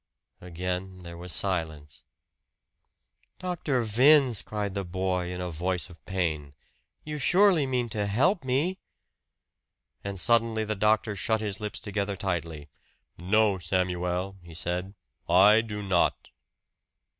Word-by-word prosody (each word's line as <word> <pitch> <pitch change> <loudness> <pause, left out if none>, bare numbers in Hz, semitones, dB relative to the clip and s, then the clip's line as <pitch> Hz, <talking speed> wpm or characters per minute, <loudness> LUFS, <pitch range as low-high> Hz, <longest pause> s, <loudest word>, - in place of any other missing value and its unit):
Again 90 +1 -5
there 85 0 -9
was 90 +1 -8
silence. 80 -7 -2 1.3
"Dr. 165 -9 -1
Vince," 125 +1 +5
cried 105 -2 -4
the 100 0 -2
boy 90 0 -2
in 90 - -5
a 90 -1 -4
voice 90 -1 -2
of 85 - -17
pain, 80 -7 -2 0.5
"you 150 0 -5
surely 180 0 +4
mean 125 -2 0
to 105 -1 -2
help 150 - +2
me!" 145 +9 0 1.2
And 100 -1 -4
suddenly 115 0 +2
the 110 - -1
doctor 105 +1 +1
shut 110 +3 0
his 105 -3 -4
lips 105 -1 -4
together 100 -1 -3
tightly. 85 -6 -4 0.5
"No, 100 +2 +2
Samuel," 90 +1 -1
he 85 -1 -13
said. 90 +3 -3 0.3
"I 100 +5 +7
do 105 -2 -6
not!" 95 -3 0
95 Hz, 125 wpm, -27 LUFS, 90-110 Hz, 1.3 s, I